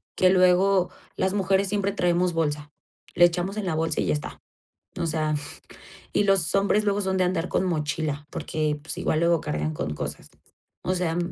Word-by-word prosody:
que 185 - +4
luego 185 0 +4 0.3
las 190 0 +1
mujeres 195 0 +2
siempre 200 0 0
traemos 180 -1 +1
bolsa, 150 -2 -1 0.5
le 175 - +7
echamos 175 +4 -1
en 210 - -2
la 170 -4 -1
bolsa 160 0 0
y - - 0
ya - - +2
está, 150 - -5 0.6
o 170 - 0
sea, 155 -1 0 0.8
y 205 - +2
los 195 -4 +2
hombres 200 +2 +2
luego 205 0 +1
son 190 0 0
de 185 - +3
andar 180 -1 -1
con - - +1
mochila, 150 -3 -2
porque, 155 -1 -2
pues, 160 - -5
igual 155 - 0
luego 170 -1 +3
cargan 75 +1 -2
con 75 0 -3
cosas, - - -6 0.5
o 185 - 0
sea, 175 -2 -1
175 Hz, 185 wpm, -25 LUFS, 155-190 Hz, 0.8 s, le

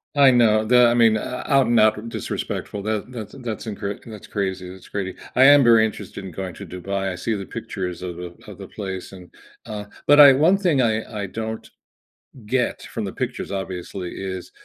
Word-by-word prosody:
I 140 -2 +7
know, 110 -3 +4
the 125 +2 +5
I 120 - +3
mean, 115 -2 +4
ou - - -2
out 130 +3 +1
and 120 -1 +3
out 110 +1 +2
disrespectful, 100 -2 -4
that 110 +3 -3
that's 110 -5 -8
in 130 - -11
that's 115 -2 -5
incorrect, 105 -2 -5
that's 110 -3 -10
crazy, 95 -3 -3
it's 95 0 -12
crazy 95 -2 -4 0.2
I 130 - +6
am 145 0 +8
very 115 -2 +6
interested 100 -1 -8
in 95 - -7
going 95 +1 -6
to - - -9
Dubai, 95 +1 -3
I - - -5
see 110 +6 -2
the 100 -2 -4
pictures 90 -6 -5
of 90 -1 -6
of 85 -1 -8
of - - -10
the - - -8
place, 95 -3 -6
and, 90 -2 -13 0.3
uh 105 -1 -6 0.2
but 145 +1 +6
I 140 -2 +10
one 160 +8 +4
thing 175 -9 +2
I 110 -1 -1
I - - -2
don't 110 +3 -5 0.8
get 125 +3 -1
from - - -5
the - - -4
pictures, - - -4
obviously 95 -1 -5
is, 95 -2 -6
110 Hz, 210 wpm, -22 LUFS, 95-120 Hz, 0.8 s, I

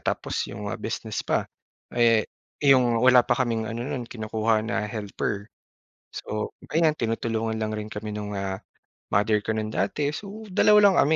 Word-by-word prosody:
tapos - - -2
yung 100 0 -5
mga - - -4
business 110 -1 -3
pa. - - +1 0.5
Eh, 115 -2 +4 0.4
yung 125 -4 +5
wala 125 -1 +6
pa - - +3
kaming 115 -2 -1
ano 115 +1 -4
no'n, 125 -2 -4
kinukuha 110 -1 0
na 110 -2 -1
helper. 105 -1 -4 0.6
So 105 0 -4 0.2
ayan, 160 -1 +3
tinutulungan 115 -2 -1
lang 110 -1 -2
rin 105 0 -4
kami 105 0 -5
nung, 105 -1 -5
ah, 95 +1 -4 0.5
mother 105 +2 +3
ko 110 - 0
no'n, 110 0 -2
dati. 145 +6 0
So, 200 +8 -7
2 210 +2 +6
lang 190 - +1
kami 155 +3 +4
110 Hz, 165 wpm, -25 LUFS, 110-125 Hz, 0.6 s, wala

